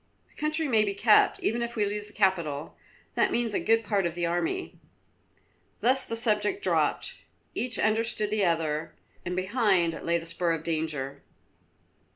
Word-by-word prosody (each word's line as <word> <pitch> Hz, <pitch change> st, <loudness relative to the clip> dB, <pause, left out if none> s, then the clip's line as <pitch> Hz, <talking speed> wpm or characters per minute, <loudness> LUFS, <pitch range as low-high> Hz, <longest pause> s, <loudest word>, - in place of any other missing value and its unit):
The -, -, -27 dB
country 305 Hz, +1 st, -1 dB
may 220 Hz, -5 st, +4 dB
be 200 Hz, -1 st, -2 dB
kept, 215 Hz, +1 st, +4 dB
even 235 Hz, +2 st, 0 dB
if 235 Hz, 0 st, -3 dB
we 210 Hz, -2 st, +1 dB
lose 205 Hz, +1 st, -3 dB
the 210 Hz, -, -15 dB
capital; 170 Hz, -8 st, 0 dB, 0.4 s
that -, -, +2 dB
means 235 Hz, -2 st, 0 dB
a -, -, +1 dB
good 225 Hz, +1 st, +2 dB
part 200 Hz, -4 st, +1 dB
of 170 Hz, -, -6 dB
the 175 Hz, -1 st, -1 dB
army." 175 Hz, -, -2 dB, 1.0 s
Thus 260 Hz, +2 st, +2 dB
the 230 Hz, -, -4 dB
subject 220 Hz, -, 0 dB
dropped. -, -, 0 dB, 0.3 s
Each 245 Hz, -3 st, +1 dB
understood 220 Hz, -1 st, +2 dB
the 215 Hz, -1 st, +1 dB
other, 160 Hz, -2 st, 0 dB, 0.3 s
and 180 Hz, -, -2 dB
behind 185 Hz, -4 st, +1 dB
lay 170 Hz, 0 st, +1 dB
the 165 Hz, -, -7 dB
spur 170 Hz, 0 st, 0 dB
of 160 Hz, -1 st, -4 dB
danger. 155 Hz, -4 st, -3 dB
205 Hz, 170 wpm, -27 LUFS, 170-225 Hz, 1.0 s, may